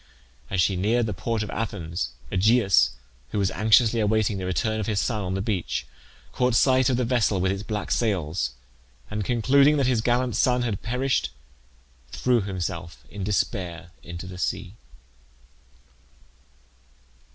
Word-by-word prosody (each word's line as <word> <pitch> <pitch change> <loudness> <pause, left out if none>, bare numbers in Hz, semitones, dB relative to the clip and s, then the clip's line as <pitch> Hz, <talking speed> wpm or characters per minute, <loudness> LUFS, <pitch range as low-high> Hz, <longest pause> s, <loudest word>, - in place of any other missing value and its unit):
As 95 - -1
she 95 +2 +3
neared 110 +6 +1
the 105 - -2
port 110 +4 -2
of 105 - -6
Athens, 85 -7 -3 0.2
Aegeus, 95 - +4 0.4
who - - -4
was 100 -2 +1
anxiously 110 +2 +4
awaiting 110 -1 +1
the 90 - -4
return 110 +4 0
of 105 - -3
his 105 -3 0
son 110 -4 -1
on 95 -1 -2
the 95 - -2
beach, 100 -6 -2 0.5
caught 125 -2 +1
sight 130 0 +4
of 125 - +1
the 125 - +1
vessel 115 -5 +1
with 95 +1 +1
its 100 0 -3
black 105 0 -4
sails, 90 - 0 0.6
and 105 -1 -2
concluding 140 +7 +4
that 140 - +2
his 125 -3 +2
gallant 120 0 +1
son 125 -1 +2
had 110 -5 -2
perished, 125 - 0 0.8
threw 125 - +1
himself 85 -7 -5
in 100 +4 -6
despair 90 -4 -2
into 85 +2 -8
the 90 -1 -9
sea. 90 0 -2
105 Hz, 150 wpm, -25 LUFS, 95-120 Hz, 0.8 s, Aegeus